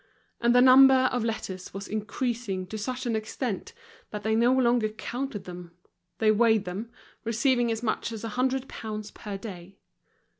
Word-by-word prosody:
And 240 +1 +3
the 250 - +7
number 260 0 +7
of 245 -2 0
letters 190 -5 -4
was 200 0 -5
increasing 215 -2 -3
to 220 - -5
such 255 +5 -4
an 235 -2 0
extent 220 - -3 0.4
that 210 -1 -6
they 220 - +1
no 235 +3 +4
longer 240 -4 +3
counted 235 0 -5
them; 175 -1 -9 0.4
they 215 -1 +4
weighed 220 -1 +3
them, 195 +6 -5 0.3
receiving 235 +1 +2
as 225 +1 -3
much 225 0 -1
as 225 -1 -6
a 225 - -3
hundred 255 +3 0
pounds 215 -1 -6
per 205 -2 -7
day. 195 -3 -9
225 Hz, 165 wpm, -27 LUFS, 210-245 Hz, 0.4 s, the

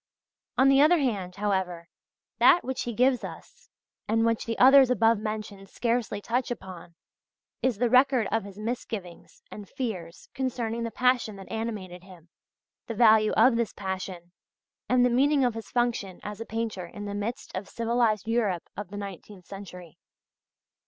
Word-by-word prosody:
On 265 - +5
the 275 0 +6
other 325 +4 +6
hand, 200 - -2
however, 190 -4 -2 0.5
that 350 - +6
which 260 0 -3
he 240 - -3
gives 250 +1 +2
us, - - -11 0.4
and 225 +1 +2
which 230 -1 0
the 230 -1 -3
others 265 0 +7
above 230 -3 +3
mentioned 215 -2 -6
scarcely 235 -3 -1
touch 240 +5 -1
upon, 185 -7 -8 0.7
is 255 -5 +1
the 245 +3 +2
record 255 -2 +4
of 225 0 0
his 200 -1 -11
misgivings 215 -5 -6
and 205 -2 -9
fears 185 -10 -5
concerning 235 -3 -2
the 230 - -2
passion 245 -3 +1
that 195 -1 -11
animated 210 -6 -5
him, 180 -3 -16 0.6
the 230 - -4
value 215 -1 +5
of 250 -2 +5
this 235 -2 -1
passion, 185 -3 -6 0.6
and 250 0 +4
the - - +3
meaning 275 +2 +3
of 245 - +1
his 225 0 -8
function 235 -6 -1
as 210 +1 -7
a 230 - -6
painter 220 -5 -4
in 205 +3 -8
the 205 - -5
midst 205 +4 -4
of 195 +1 -5
civilised 230 -3 0
Europe 215 -7 0
of 205 0 -6
the 205 - -7
nineteenth 200 -1 -9
century. 180 -4 -11
220 Hz, 165 wpm, -27 LUFS, 195-245 Hz, 0.7 s, others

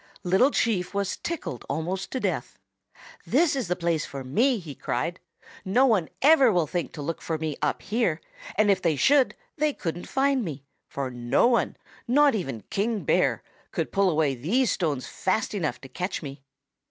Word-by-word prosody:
Little 190 +9 +4
Chief 205 -8 0
was 200 -1 -1
tickled 330 - -5
almost 175 +6 -2
to 260 - -3
death. - - -2 0.7
"'This 330 -4 +3
is 260 -7 -2
the 180 - 0
place 170 -3 0
for 135 -1 -6
me!' 235 - +2
he 165 -7 -8
cried. 150 +7 -3 0.4
'No 240 +8 +3
one 210 -10 +2
ever 275 -5 +7
will 175 -4 +2
think 175 +2 -3
to 150 - -6
look 165 +3 -4
for 160 - -2
me 155 -2 -3
up 150 - -1
here, 195 -6 0 0.4
and 205 0 +4
if 190 -1 +1
they 165 -4 +2
should 270 - +4 0.2
they 300 0 +1
couldn't 175 -4 -5
find 270 -1 +2
me, 145 -7 -6 0.2
for 135 -2 -4
no 120 - +2
one, 240 -1 +2 0.3
not 285 +3 +5
even 135 - -3
King 215 +1 0
Bear, - - +2 0.3
could - - -3
pull 195 -1 +3
away 155 -4 +2
these 200 - +1
stones 150 -7 -1
fast 190 +4 -1
enough 175 -7 -2
to 135 - -10
catch 180 +7 -4
me. 140 -1 -8
185 Hz, 180 wpm, -26 LUFS, 155-235 Hz, 0.7 s, ever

